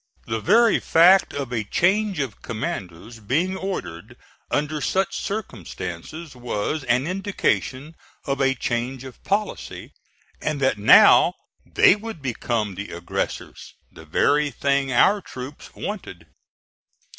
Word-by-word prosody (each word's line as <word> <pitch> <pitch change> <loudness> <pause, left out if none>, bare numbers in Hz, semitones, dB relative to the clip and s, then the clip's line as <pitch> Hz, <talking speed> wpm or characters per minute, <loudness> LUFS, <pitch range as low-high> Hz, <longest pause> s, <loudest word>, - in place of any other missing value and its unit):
The 115 0 -2
very 225 - +4
fact 180 +4 +5
of 140 -3 -5
a 110 -2 -1
change 195 - +1
of 130 -7 -4
commanders 110 0 -6
being 155 - 0
ordered 185 - -6 0.3
under 150 +1 -1
such 190 +7 0
circumstances 150 - -6
was 125 +4 -3
an 125 +2 +2
indication 170 -6 -2 0.3
of 140 -1 -1
a 135 0 +2
change 120 +2 -3
of 130 -2 -12
policy, 205 +2 -3 0.5
and 155 -2 -2
that 130 -6 +1
now 105 - +7 0.3
they - - +5
would 220 -3 -8
become 115 -5 -2
the 100 +2 -7
aggressors 85 +1 -5 0.2
the 80 - -13
very 145 - +2
thing 140 -1 0
our 200 +11 +4
troops 135 -3 -9
wanted. 95 - -6
135 Hz, 120 wpm, -23 LUFS, 115-180 Hz, 0.5 s, now